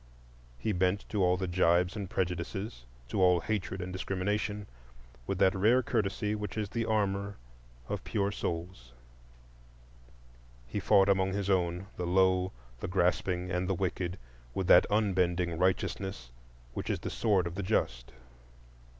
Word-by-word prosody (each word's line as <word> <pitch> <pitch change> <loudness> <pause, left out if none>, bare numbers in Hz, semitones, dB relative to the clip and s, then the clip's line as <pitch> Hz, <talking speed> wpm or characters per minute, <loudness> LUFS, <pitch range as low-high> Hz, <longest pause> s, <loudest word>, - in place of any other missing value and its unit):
He 110 - -1
bent 95 +1 +1
to 105 -3 +1
all 90 0 +3
the 95 0 -2
gibes 90 +1 +3
and 100 -4 -4
prejudices, 90 - -3 0.2
to 95 - 0
all 90 -1 +5
hatred 95 -3 -2
and 90 0 -6
discrimination, 100 +3 -2 0.6
with 95 - -1
that 95 0 +4
rare 110 +7 +4
courtesy 105 -1 0
which 105 -1 -4
is 105 -2 -2
the 115 +1 -2
armor 100 -2 0 0.5
of - - -3
pure 100 -1 0
souls. 85 -10 -5 1.7
He - - -3
fought 95 0 +5
among 95 -1 +2
his 100 0 -1
own, 90 0 +1
the 90 - -2
low, 95 0 +3 0.3
the - - -4
grasping, 90 0 0
and 90 0 -1
the 95 - +1
wicked, 90 0 -2 0.4
with 95 - -1
that 90 - +7
unbending 90 -5 +1
righteousness 95 -6 -1 0.4
which - - -4
is - - -1
the - - -4
sword 100 -6 +2
of 85 - -4
the 100 - -3
just. 65 - -1
95 Hz, 150 wpm, -31 LUFS, 90-100 Hz, 1.7 s, that